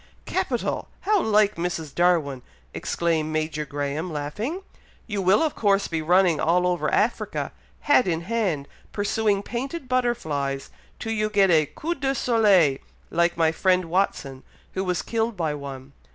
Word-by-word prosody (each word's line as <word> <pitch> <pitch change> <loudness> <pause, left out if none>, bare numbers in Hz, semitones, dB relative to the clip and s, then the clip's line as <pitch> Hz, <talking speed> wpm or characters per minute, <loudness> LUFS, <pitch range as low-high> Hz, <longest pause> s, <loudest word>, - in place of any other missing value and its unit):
"Capital! - - -2
How 410 -1 +2
like 210 -3 +3
Mrs. 170 -4 -3
Darwin!" 165 -7 +2 0.3
exclaimed 160 -2 -1
Major 155 -1 -2
Graham, 145 +4 -3
laughing. 210 - -4 0.4
"You 205 -3 -3
will 190 - +4
of 310 - 0
course 200 -2 +2
be 165 -1 -2
running 175 -1 +3
all 175 +2 +2
over 180 -1 0
Africa, - - 0 0.3
hat 290 -6 +4
in 165 -2 0
hand, 185 -8 -1 0.2
pursuing 205 -1 0
painted 265 +6 -5
butterflies, 155 - -1 0.3
till 225 - -4
you 215 -1 0
get 200 -3 +4
a 155 -3 +4
coup 335 +3 -3
de 275 -3 -1
soleil, 200 - +4 0.3
like 170 0 +2
my 160 -1 +3
friend 185 +2 +2
Watson, 165 -7 -1 0.3
who 190 - -1
was 180 -2 -1
killed 225 -2 -1
by 160 -3 0
one. 140 -1 -8
180 Hz, 150 wpm, -24 LUFS, 155-215 Hz, 0.4 s, will